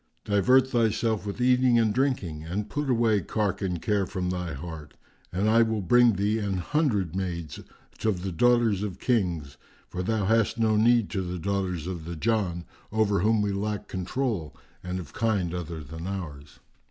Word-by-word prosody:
Divert 115 Hz, +6 st, +4 dB
thyself 110 Hz, -2 st, +1 dB
with 100 Hz, -, -5 dB
eating 125 Hz, -1 st, +4 dB
and 110 Hz, -2 st, +3 dB
drinking 105 Hz, -, -1 dB
and 100 Hz, +6 st, -4 dB
put 145 Hz, -1 st, -2 dB
away 115 Hz, -4 st, +3 dB
cark 100 Hz, +1 st, -1 dB
and 90 Hz, -3 st, -1 dB
care 100 Hz, +1 st, 0 dB
from 90 Hz, -2 st, -2 dB
thy 90 Hz, -4 st, -3 dB
heart, 75 Hz, 0 st, -8 dB, 0.4 s
and 95 Hz, +4 st, 0 dB
I 115 Hz, +2 st, +5 dB
will 110 Hz, -3 st, +1 dB
bring 120 Hz, +5 st, +5 dB
thee 100 Hz, +3 st, 0 dB
an 100 Hz, -3 st, -1 dB
hundred 100 Hz, -, 0 dB
maids 85 Hz, -5 st, -4 dB, 0.4 s
of 95 Hz, -5 st, 0 dB
the 95 Hz, -, -2 dB
daughters 115 Hz, +1 st, +3 dB
of 100 Hz, -4 st, -4 dB
Kings; 85 Hz, -, -1 dB, 0.3 s
for 90 Hz, -, -4 dB
thou 105 Hz, +1 st, 0 dB
hast 115 Hz, +2 st, +2 dB
no 110 Hz, -1 st, +2 dB
need 115 Hz, 0 st, +3 dB
to 95 Hz, -, -1 dB
the 90 Hz, 0 st, -4 dB
daughters 90 Hz, -2 st, -2 dB
of 90 Hz, -3 st, -5 dB
the 85 Hz, 0 st, -5 dB
Jann, 90 Hz, -2 st, -1 dB, 0.3 s
over 105 Hz, -2 st, +2 dB
whom 105 Hz, +2 st, +2 dB
we 100 Hz, -, 0 dB
lack 105 Hz, +1 st, -3 dB
controul 95 Hz, -, -3 dB, 0.3 s
and 90 Hz, 0 st, -3 dB
of 80 Hz, -5 st, -9 dB
kind 100 Hz, -7 st, 0 dB
other 85 Hz, -3 st, -5 dB
than 80 Hz, +5 st, -7 dB
ours." 75 Hz, -7 st, -6 dB
100 Hz, 180 wpm, -27 LUFS, 90-110 Hz, 0.4 s, I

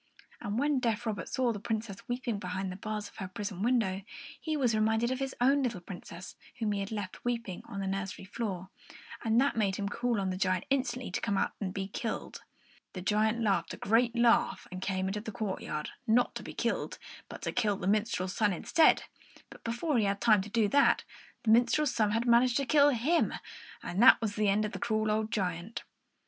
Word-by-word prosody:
And 205 Hz, +2 st, -3 dB
when 285 Hz, +1 st, +2 dB
deaf 235 Hz, -1 st, -1 dB
Robert 215 Hz, -3 st, -3 dB
saw 250 Hz, -2 st, +1 dB
the 205 Hz, -, -6 dB
Princess 220 Hz, -2 st, -3 dB
weeping 245 Hz, -3 st, -2 dB
behind 185 Hz, 0 st, -3 dB
the -, -, -6 dB
bars 210 Hz, +1 st, -4 dB
of -, -, -17 dB
her 190 Hz, -, -4 dB
prison 195 Hz, 0 st, -5 dB
window, 215 Hz, -5 st, +1 dB, 0.4 s
he 310 Hz, -1 st, -1 dB
was 250 Hz, -5 st, +2 dB
reminded 220 Hz, +2 st, +2 dB
of 260 Hz, -, -2 dB
his 270 Hz, -1 st, -3 dB
own 275 Hz, +3 st, +4 dB
little 235 Hz, -7 st, -1 dB
Princess 175 Hz, 0 st, -9 dB, 0.2 s
whom 220 Hz, -3 st, 0 dB
he 205 Hz, -, -1 dB
had 195 Hz, +1 st, -4 dB
left 205 Hz, -4 st, -5 dB
weeping 230 Hz, -6 st, -3 dB
on 200 Hz, -, -6 dB
the -, -, -2 dB
nursery 195 Hz, 0 st, -3 dB
floor; 190 Hz, -3 st, -4 dB, 0.5 s
and 225 Hz, +1 st, +3 dB
that 275 Hz, +2 st, +2 dB
made 200 Hz, -4 st, +1 dB
him 200 Hz, 0 st, -2 dB
call 235 Hz, +2 st, -1 dB
on 190 Hz, -1 st, -1 dB
the 185 Hz, -, -3 dB
giant 185 Hz, -1 st, 0 dB
instantly 255 Hz, -5 st, 0 dB
to -, -, -2 dB
come 200 Hz, -, 0 dB
out -, -, +1 dB
and 190 Hz, -2 st, -2 dB
be 195 Hz, 0 st, -3 dB
killed. 220 Hz, +3 st, -4 dB, 0.5 s
The 180 Hz, -, -6 dB
giant 215 Hz, +3 st, +1 dB
laughed 195 Hz, -5 st, +1 dB
a -, -, -15 dB
great 230 Hz, +3 st, +2 dB
laugh 235 Hz, 0 st, +3 dB
and 185 Hz, 0 st, -6 dB
came 190 Hz, -1 st, -1 dB
out -, -, 0 dB
into -, -, -3 dB
the 220 Hz, -, -6 dB
courtyard, 190 Hz, -7 st, -4 dB, 0.2 s
not 240 Hz, +2 st, +3 dB
to -, -, -5 dB
be -, -, -9 dB
killed, -, -, -1 dB, 0.3 s
but -, -, -9 dB
to -, -, -1 dB
kill 210 Hz, -5 st, +1 dB
the 180 Hz, -, -5 dB
minstrel's 200 Hz, -2 st, 0 dB
son 210 Hz, -3 st, +2 dB
instead; 315 Hz, -, +4 dB, 0.5 s
but -, -, -13 dB
before 240 Hz, +4 st, 0 dB
he 215 Hz, -, +2 dB
had 200 Hz, 0 st, 0 dB
time 215 Hz, -4 st, +5 dB
to 200 Hz, -, -7 dB
do 220 Hz, -1 st, +2 dB
that, 280 Hz, +3 st, +4 dB, 0.4 s
the 220 Hz, -, +3 dB
minstrel's 245 Hz, +5 st, +4 dB
son 215 Hz, -3 st, +2 dB
had 225 Hz, +3 st, 0 dB
managed 240 Hz, 0 st, +4 dB
to 275 Hz, -, 0 dB
kill 290 Hz, +1 st, +5 dB
him, 285 Hz, +7 st, +1 dB, 0.5 s
and 185 Hz, +4 st, -2 dB
there 255 Hz, -, +9 dB
was 215 Hz, -3 st, -2 dB
an 210 Hz, -, +3 dB
end 205 Hz, +2 st, +2 dB
of 210 Hz, -, -4 dB
the -, -, -6 dB
cruel 215 Hz, -1 st, 0 dB
old 215 Hz, 0 st, 0 dB
giant. 180 Hz, +2 st, -3 dB
215 Hz, 220 wpm, -30 LUFS, 195-240 Hz, 0.5 s, there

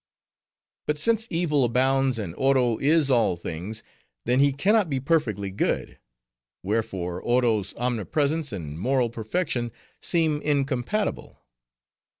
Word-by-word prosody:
But 150 Hz, -, 0 dB
since 225 Hz, +6 st, +1 dB
evil 165 Hz, -5 st, +1 dB
abounds, 130 Hz, +1 st, +2 dB
and 100 Hz, -7 st, -4 dB
Oro 130 Hz, -1 st, +2 dB
is 145 Hz, 0 st, +3 dB
all 115 Hz, -7 st, +3 dB
things, 85 Hz, +5 st, -5 dB, 0.4 s
then 125 Hz, +2 st, +2 dB
he 140 Hz, 0 st, +5 dB
can 190 Hz, +10 st, +2 dB
not 210 Hz, -7 st, +3 dB
be 135 Hz, -2 st, 0 dB
perfectly 120 Hz, -, 0 dB
good; 95 Hz, -, -2 dB, 0.6 s
wherefore, 95 Hz, -4 st, -2 dB
Oro's 115 Hz, -5 st, +1 dB
omnipresence 140 Hz, -, -1 dB
and 80 Hz, -6 st, -6 dB
moral 125 Hz, +2 st, +1 dB
perfection 120 Hz, +1 st, -2 dB, 0.3 s
seem 160 Hz, -4 st, +1 dB
incompatible. 140 Hz, -, -1 dB
130 Hz, 120 wpm, -25 LUFS, 110-150 Hz, 0.6 s, he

